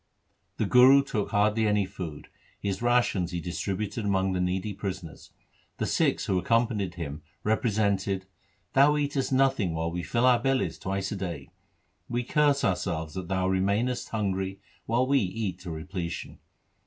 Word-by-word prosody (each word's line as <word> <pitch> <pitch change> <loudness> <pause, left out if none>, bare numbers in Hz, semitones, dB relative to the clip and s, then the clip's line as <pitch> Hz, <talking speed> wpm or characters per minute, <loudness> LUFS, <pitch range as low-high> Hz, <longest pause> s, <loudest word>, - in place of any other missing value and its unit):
The - - +1
Guru 130 +3 +7
took 110 -6 -2
hardly 105 +1 +2
any 105 -1 +2
food, 90 -6 -7 0.2
— - - -33
his 100 +1 -2
rations 120 -7 +2
he 90 - -3
distributed 95 +6 -3
among 95 -2 +1
the 90 - 0
needy 95 +3 -1
prisoners. 95 -4 -6 0.5
The - - -1
Sikhs - - +1
who 95 - +1
accompanied 110 -4 +1
him 75 -3 -5 0.2
represented 100 -3 +1 0.5
'Thou 145 +2 +5
eatest 140 -2 -1
nothing 130 -10 +2
while 80 +1 -1
we 90 +1 -3
fill 120 +7 0
our 125 -2 +5
bellies 135 +1 0
twice 95 0 -2
a - - -2
day. 85 -8 -5 0.6
We 120 +1 -1
curse 145 +2 +2
ourselves 85 -4 -1
that 95 0 -5
thou 95 0 0
remainest 100 +7 0
hungry 95 -3 -2 0.3
while 120 +3 +2
we 140 +1 +3
eat 95 -2 -3
to 90 -1 -8
repletion. 85 +2 -5
100 Hz, 155 wpm, -27 LUFS, 90-120 Hz, 0.6 s, Guru